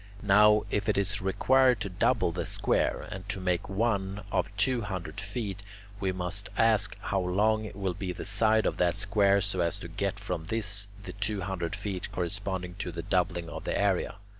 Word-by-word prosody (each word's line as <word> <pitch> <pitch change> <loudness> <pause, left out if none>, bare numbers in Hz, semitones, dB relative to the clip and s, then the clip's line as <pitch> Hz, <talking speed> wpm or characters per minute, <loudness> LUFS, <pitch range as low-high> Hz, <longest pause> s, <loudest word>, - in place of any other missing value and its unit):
Now 105 +1 +6
if 105 +1 0
it 105 - +2
is 100 +1 0
required 125 +5 +4
to - - -1
double 95 +1 +2
the 85 -1 -3
square, - - 0
and 95 0 -7
to 95 - 0
make 90 -1 -1
one 100 -1 0
of - - +1
two 130 -2 +2
hundred 100 -1 -5
feet, 100 -1 -4 0.4
we 95 -2 0
must 95 +3 -1
ask 110 -3 +3
how 100 - 0
long 105 +4 +1
will 95 -2 -1
be 90 +1 -4
the - - -6
side 110 +2 +2
of - - 0
that 90 -1 +2
square 100 -1 +3
so 100 -1 -1
as 85 +2 +1
to 90 - -8
get 100 +3 -2
from 90 -5 -4
this 105 0 -1 0.2
the 90 - -7
two 105 0 -1
hundred 90 0 -3
feet 100 -2 -4
corresponding 95 0 -3
to 90 - -3
the 85 0 -5
doubling 90 -2 0
of - - -7
the - - -1
area. 100 -2 +1
100 Hz, 190 wpm, -29 LUFS, 90-105 Hz, 0.4 s, Now